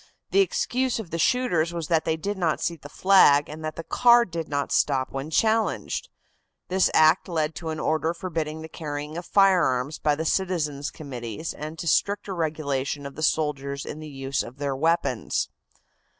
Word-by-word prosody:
The 395 - +4
excuse 370 - +1
of 220 -7 -7
the 165 - -3
shooters 175 -9 +1
was 165 -3 -3
that 160 -2 +2
they 160 -1 0
did 200 +6 -3
not 170 -5 0
see 170 - -1
the 145 -2 -12
flag 150 -6 +5
and 155 +1 -9
that 155 0 -4
the 165 - -6
car 240 +5 +5
did 170 -4 -5
not 145 -1 -2
stop 135 -3 +1
when 135 +3 -5
challenged. 220 - 0 0.6
This 185 0 +3
act 160 +3 +5
led 160 -2 -1
to 165 -1 -5
an 155 -1 -4
order 160 +1 0
forbidding 160 -3 -4
the - - -7
carrying 150 -1 -6
of 175 +1 -6
firearms 165 -9 +3
by 150 -1 +2
the 160 +2 -3
citizens' 155 -6 -1
committees 125 0 -6
and 155 +2 -7
to 170 - -5
stricter 200 +5 +1
regulation 145 -4 -2
of 140 - -6
the 155 - -8
soldiers 140 -3 -1
in 150 - -6
the 155 0 -8
use 135 -1 -2
of 125 - -9
their 140 -1 -2
weapons. 160 -6 0
160 Hz, 185 wpm, -25 LUFS, 145-180 Hz, 0.6 s, flag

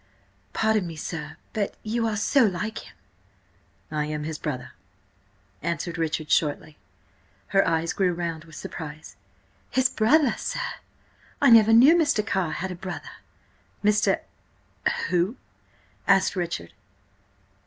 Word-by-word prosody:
"Pardon 220 -4 +1
me, 165 - -7
sir–but 160 +6 -5
you 230 +1 0
are 215 - -1
so 260 +6 +4
like 210 +1 -1
him!" - - -14 1.0
"I 150 -1 -1
am 150 0 -3
his 155 0 -4
brother," 135 -5 -4 0.9
answered 170 +1 -3
Richard 155 -1 -2
shortly. 150 0 0 0.7
Her 195 0 +3
eyes 165 0 +1
grew 185 -2 +2
round 170 -2 -4
with 160 -1 -14
surprise. 155 -1 -8 0.5
"His 260 -1 +2
brother, 255 +4 +3
sir? - - -3 0.8
I 280 -3 +5
never 225 -1 +8
knew 255 +9 +8
Mr. 290 -11 +2
Carr 190 -7 0
had 190 +1 -3
a - - -5
brother!" 185 +2 -7 0.7
"Mr.—who?" 205 -1 -1 0.7
asked 195 - +4
Richard. 170 - -3
180 Hz, 120 wpm, -25 LUFS, 160-220 Hz, 1.0 s, never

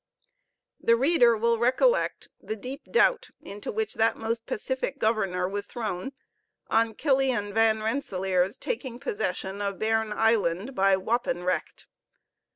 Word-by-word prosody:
The 230 - +4
reader 245 -3 +4
will 230 +1 +1
recollect 260 - +2
the 220 - -4
deep 255 +6 -7
doubt - - +3
into 205 +1 -7
which 220 0 -2
that 225 +1 +2
most 225 +1 -3
pacific 260 +4 -3
governor 195 -6 0
was 205 +1 -4
thrown 220 +1 -4 0.6
on 225 0 +2
Killian 260 -8 +1
Van 220 0 +3
Rensellaer's 190 -6 0
taking 260 - -4
possession 200 -5 -3
of 200 -1 -2
Bearn 220 0 0
Island 220 0 +1
by 195 -4 +3
wapen 190 -3 -1
recht. 185 - -2
220 Hz, 130 wpm, -27 LUFS, 200-245 Hz, 0.6 s, The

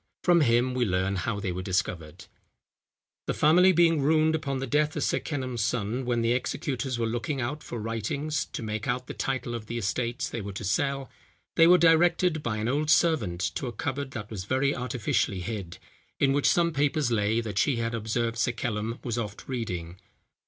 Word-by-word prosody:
From 175 -2 +5
him 120 -1 +3
we 125 -1 +1
learn 95 -1 0
how 100 +3 -2
they 100 -2 -2
were 90 +1 -4
discovered. 90 -4 -3 1.0
"The - - -1
family 180 +5 +5
being 165 -3 +4
ruined 155 +2 +3
upon 145 -4 -2
the 135 - -3
death 150 +3 +1
of - - -1
Sir - - +1
Kenelm's 130 -6 -3
son, 120 +3 -1
when 120 -1 0
the 115 - +2
executors 130 +1 -2
were 115 - 0
looking 120 +6 -2
out 135 +5 -3
for 120 - -6
writings 115 +7 -2
to - - -7
make 110 +2 -4
out 125 0 -1
the - - -7
titles 130 -3 -2
of 115 -2 -6
the 120 - -4
estates 120 +5 -1
they 115 - -5
were 100 0 -6
to 100 - -6
sell, 135 +6 -1 0.4
they 165 - +7
were 180 +1 +8
directed 170 0 +4
by 115 -6 -2
an 110 +1 -2
old 150 +4 0
servant 115 - +2
to 135 - -3
a - - -3
cupboard 135 +3 -3
that 115 -5 -7
was 95 -4 -5
very 135 +5 +1
artificially 115 -6 -1
hid, 90 -3 -5 0.4
in 135 -1 +3
which 145 0 +3
some 170 -1 +2
papers 145 -2 +1
lay 110 0 +2
that 105 -3 -2
she 140 - +2
had 115 0 -2
observed 115 +1 -1
Sir 120 +2 +1
Kenelm 115 -1 -3
was 120 -1 -2
oft 105 -3 -6
reading. 90 -9 -4
120 Hz, 200 wpm, -27 LUFS, 110-145 Hz, 1.0 s, were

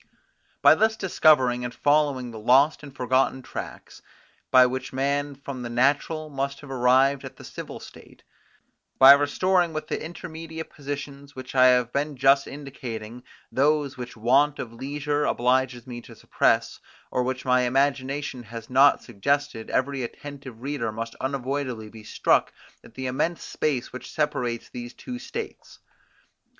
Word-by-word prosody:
By - - +9
thus 220 0 +2
discovering 140 - +3
and 120 - -3
following 145 -3 +1
the 110 - -8
lost 135 +7 +4
and 145 -2 -10
forgotten 130 +1 +1
tracks, - - -8 0.5
by 130 -1 +7
which 130 +1 -3
man 140 +2 -1
from 140 -1 -7
the 120 - -5
natural 145 +6 +1
must 140 -1 -4
have 140 -2 -10
arrived 130 +2 +3
at - - -9
the - - -13
civil - - -8
state; - - -15 0.7
by 135 +1 +10
restoring, 170 +5 +3
with 155 0 -5
the - - -3
intermediate 160 -1 -8
positions 140 0 -7
which 130 -1 -8
I 130 -1 +6
have 125 -1 +3
been 145 0 -2
just 135 +2 +4
indicating, 125 -5 -7 0.3
those 145 0 +1
which 125 -2 -8
want 135 +6 +3
of 115 - -6
leisure 145 +4 -2
obliges 125 0 +1
me 120 -2 -7
to - - -14
suppress, - - +1 0.3
or 125 - +1
which 130 +1 -3
my 125 0 +3
imagination 135 +1 0
has 115 0 -10
not 140 +2 +5
suggested, 140 +1 -2
every 135 +1 0
attentive 130 -1 -8
reader 135 -5 -2
must 115 +1 -5
unavoidably 130 -4 -3
be 110 -1 -12
struck - - +1 0.3
at 115 - -17
the 130 - -5
immense 150 +7 -1
space 140 -6 -2
which 125 - -8
separates 125 -6 -2
these 120 -1 -8
two 250 -2 -7
states. 425 - -7
135 Hz, 150 wpm, -25 LUFS, 125-145 Hz, 0.7 s, by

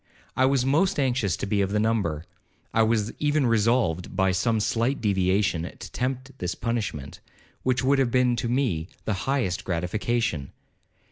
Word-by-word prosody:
I 130 - +3
was 135 -1 +2
most 155 +6 +2
anxious 125 - +1
to - - -3
be 100 0 +1
of 95 - 0
the 105 +1 0
number—I 90 -1 -2
was 110 -1 +1
even 150 -1 +2
resolved, 115 -6 +1
by 95 0 +3
some 110 +5 +1
slight 115 +5 0
deviation, 95 -3 +1
to 85 - -8
tempt 130 +1 -3
this 90 0 -2
punishment, 110 - -3 0.4
which 130 0 0
would 135 +1 +3
have 130 -3 +2
been 125 0 +3
to 115 - -2
me 115 - 0 0.2
the 110 - 0 0.2
highest 125 -10 0
gratification. 90 - -1
115 Hz, 155 wpm, -25 LUFS, 95-125 Hz, 0.4 s, I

